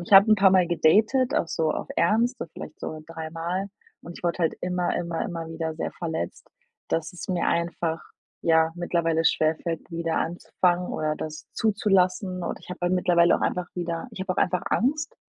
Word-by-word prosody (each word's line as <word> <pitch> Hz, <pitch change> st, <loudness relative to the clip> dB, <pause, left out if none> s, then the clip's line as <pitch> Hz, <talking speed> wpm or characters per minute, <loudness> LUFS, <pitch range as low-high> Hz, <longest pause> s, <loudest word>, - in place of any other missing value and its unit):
Ähm, -, -, -5 dB
ich -, -, -6 dB
habe 200 Hz, +3 st, +9 dB
'n -, -, +8 dB
paarmal 190 Hz, -3 st, +5 dB
gedatet, 215 Hz, +10 st, +3 dB
auch -, -, +1 dB
so 160 Hz, 0 st, 0 dB
auf -, -, -3 dB
Ernst, 230 Hz, +7 st, +2 dB
also 165 Hz, -, -5 dB
vielleicht 155 Hz, -, -9 dB
so 155 Hz, 0 st, -5 dB
3 165 Hz, -1 st, -6 dB
Mal 175 Hz, +4 st, -2 dB, 0.4 s
und 170 Hz, +1 st, -9 dB
ich -, -, -15 dB
wurde 170 Hz, +1 st, 0 dB
halt 165 Hz, -2 st, +1 dB
immer, 180 Hz, 0 st, 0 dB
immer, 170 Hz, -1 st, -2 dB
immer 165 Hz, -2 st, -4 dB
wieder 160 Hz, -1 st, -3 dB
sehr -, -, -4 dB
verletzt, 160 Hz, -2 st, -4 dB, 0.4 s
dass 165 Hz, 0 st, -1 dB
es 180 Hz, -, -8 dB
mir 180 Hz, -2 st, 0 dB
einfach, 170 Hz, -1 st, -1 dB, 0.4 s
ja, 160 Hz, -1 st, +3 dB
mittlerweile 165 Hz, -2 st, 0 dB
schwer 155 Hz, 0 st, +3 dB
fällt 170 Hz, 0 st, -5 dB
wieder 165 Hz, -1 st, -2 dB
anzufangen 175 Hz, +1 st, 0 dB
oder 155 Hz, 0 st, -1 dB
das 155 Hz, 0 st, -6 dB
zuzulassen 190 Hz, -3 st, +1 dB
und -, -, -3 dB
ich -, -, -13 dB
habe 175 Hz, -1 st, -2 dB
mir 185 Hz, -, +2 dB
mittlerweile 175 Hz, -1 st, +4 dB
auch -, -, -6 dB
einfach 180 Hz, -1 st, -1 dB
wieder 170 Hz, +4 st, -3 dB
ich 210 Hz, -, -9 dB
habe 190 Hz, -, -1 dB
auch -, -, -5 dB
einfach 180 Hz, 0 st, +1 dB
Angst 295 Hz, +5 st, 0 dB
175 Hz, 200 wpm, -26 LUFS, 165-185 Hz, 0.4 s, habe